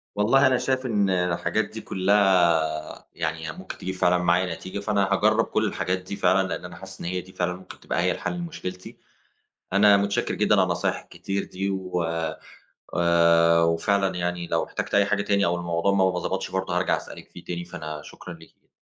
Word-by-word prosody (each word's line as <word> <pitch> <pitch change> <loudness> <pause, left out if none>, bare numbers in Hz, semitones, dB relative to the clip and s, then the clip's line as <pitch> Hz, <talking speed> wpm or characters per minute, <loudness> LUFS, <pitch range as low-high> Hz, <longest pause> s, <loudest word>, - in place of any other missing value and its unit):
والله 125 +7 +4
أنا 130 -1 +3
شايف 130 +1 -1
إن 105 -5 +1
الحاجات 90 -2 0
دي - - -9
كلّها 90 -6 +2
يعني 80 0 -3
هي - - -3
ممكن - - -9
تجيب 95 0 -5
فعلًا 90 0 +3
معايا 90 0 +1
نتيجة، 95 +4 -7
فأنا 100 -1 +1
هاجرّب 110 +3 +3
كلّ 110 - 0
الحاجات 90 -2 -1
دي 95 +2 -7
فعلًا، 95 0 +2
لأن 90 - -5
أنا 90 -1 -9
حاسس 95 +2 -11
إن - - -7
هي 90 +1 -2
دي 95 +1 -16
فعلًا 90 0 -1
ممكن 95 +1 -12
تبقى - - -2
هي 90 +1 +2
الحل - - -3
لمشكلتي، 155 - -7 0.8
أنا 100 +1 +6
مُتشكر 100 0 0
جدًا - - +2
على - - +4
النصايح - - -1
الكتير 100 0 -4
دي 95 +1 -3
و 90 -2 -2 1.0
آآ، 85 -1 +4
وفعلًا 95 +4 +1
يعني 90 -1 -2
لو - - 0
احتجت - - -4
أي 100 0 +5
حاجة 100 0 0
تاني 100 -1 +1
أو 85 - +1
الموضوع 85 +2 0
ما 95 -1 +3
ب - - -2
ما 90 - -1
ضبطش 95 +2 -3
برضو 95 0 -2
هارجع - - +1
أسألِك - - -10
فيه - - -12
تاني، 85 0 -5
فأنا 80 -4 -7
شكرًا 90 - -10
ليكِ. 80 -1 -18
95 Hz, 200 wpm, -25 LUFS, 85-100 Hz, 1.0 s, أنا